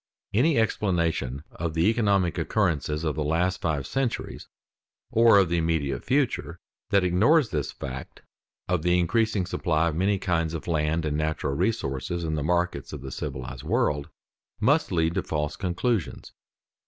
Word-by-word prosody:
Any 140 +8 +3
explanation 85 - 0
of 85 -2 -4
the 80 +1 +2
economic 100 -6 +2
occurrences 80 -6 0
of 80 -2 0
the 75 - -1
last 90 +5 0
five 75 -5 -1
centuries 135 - -3 0.6
or 115 -2 +6
of 95 -4 +4
the 85 - +1
immediate 80 -4 -1
future, 120 -11 0 0.3
that 100 -3 +3
ignores 110 - +3
this 75 -4 -2
fact 65 -1 -8 0.4
of 90 -3 +1
the 90 +2 +3
increasing 100 +2 +1
supply 85 -2 0
of 75 - -4
many 100 +4 +2
kinds 85 -4 -1
of 80 - -6
land 80 0 0
and 75 -1 -1
natural 80 -2 -1
resources 85 - -1
in 80 -1 -2
the 75 - -1
markets 85 -2 -1
of - - -6
the 65 - -7
civilized 65 0 -5
world, 70 -1 0 0.5
must 140 +7 +2
lead 80 -2 +1
to 95 - 0
false 75 -3 -2
conclusions. 95 +2 -2
85 Hz, 155 wpm, -26 LUFS, 75-100 Hz, 0.6 s, or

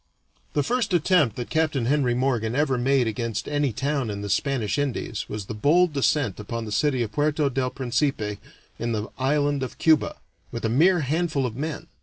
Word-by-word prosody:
The 145 - +1
first 225 - 0
attempt 160 - +3
that 120 - -6
Capt. 155 -1 +1
Henry 130 0 +1
Morgan 120 -3 0
ever 140 -2 +2
made 130 +1 +2
against 115 0 -3
any 145 -2 0
town 135 +1 -1
in 100 -1 -4
the 100 - -3
Spanish 115 -1 0
Indies 125 -6 -3
was 105 -2 -5
the 110 - -6
bold 155 +9 +3
descent 140 -7 +1
upon 115 +2 -4
the 105 - -7
city 130 +2 +1
of 110 - -5
Puerto 145 +3 +1
del 130 0 0
Principe 120 -5 -1 0.4
in 115 0 -1
the 110 0 -3
island 145 +1 +1
of 130 - -5
Cuba, 160 -2 +3 0.4
with 115 -1 -4
a - - +1
mere 170 +9 +4
handful 155 -1 0
of 115 -3 -4
men. 150 +3 -4
135 Hz, 190 wpm, -25 LUFS, 115-150 Hz, 0.4 s, mere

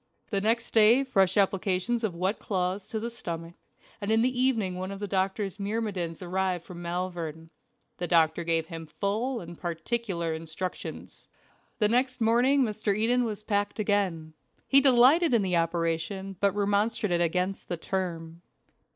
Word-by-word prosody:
The 200 -2 +1
next 230 +2 0
day 225 +4 +6
fresh 195 -8 +2
applications 195 +3 +1
of 200 -6 -1
wet 185 +5 -1
cloths 185 0 -2
to 220 - -3
the 235 +2 -4
stomach, 170 -6 -6 0.5
and 200 - -3
in 225 +1 +4
the 250 0 +1
evening 225 -8 +1
one 185 +1 -4
of 195 - -6
the 205 - -3
doctor's 195 +1 -1
myrmidons 200 -5 -3
arrived 180 -1 -1
from 175 -1 -9
Malvern. 170 -2 -4 0.5
The 175 - -3
doctor 165 0 +3
gave 165 -1 +1
him 165 -1 -8
full 220 - -2
and 170 0 -9
particular 175 -1 -2
instructions. 165 +3 -6 0.5
The 210 - +3
next 255 +3 +1
morning 245 +5 +4
Mr. 215 -3 -1
Eden 245 +3 +2
was 215 -2 -5
packed 205 -1 -1
again. 195 -7 0 0.3
He 275 0 +6
delighted 270 +3 +5
in 220 - +3
the 180 -2 +1
operation, 165 +3 -1
but 200 -1 +2
remonstrated 205 -2 +1
against 180 +3 -1
the 175 - -2
term. 165 -2 -4
195 Hz, 155 wpm, -28 LUFS, 175-225 Hz, 0.5 s, day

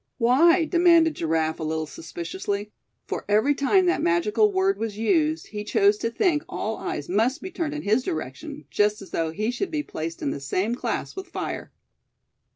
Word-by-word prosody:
"Why?" 320 +8 +5
demanded 335 -1 +4
Giraffe, 160 - -1
a - - -4
little 160 0 -1
suspiciously; 325 - -5 0.3
for - - -4
every 220 +8 +4
time 325 +7 +3
that 355 - +2
magical 210 - +2
word 385 +1 +1
was 220 -2 -3
used 310 - +1
he 210 -1 -5
chose 205 0 +3
to 230 - -1
think 310 - +1
all 220 +1 -3
eyes 145 - -4
must 225 - +1
be 375 - -7
turned 315 -4 -3
in 300 - -5
his 215 +5 +2
direction; 150 - -5
just 210 0 +1
as 195 - -14
though 165 -1 -1
he 215 +8 -2
should 360 +10 -3
be 305 -2 -2
placed 165 - -6
in 140 - 0
the - - -4
same 185 +11 -1
class 245 - -3
with 380 0 -6
fire. - - -5
230 Hz, 185 wpm, -25 LUFS, -, 0.3 s, Why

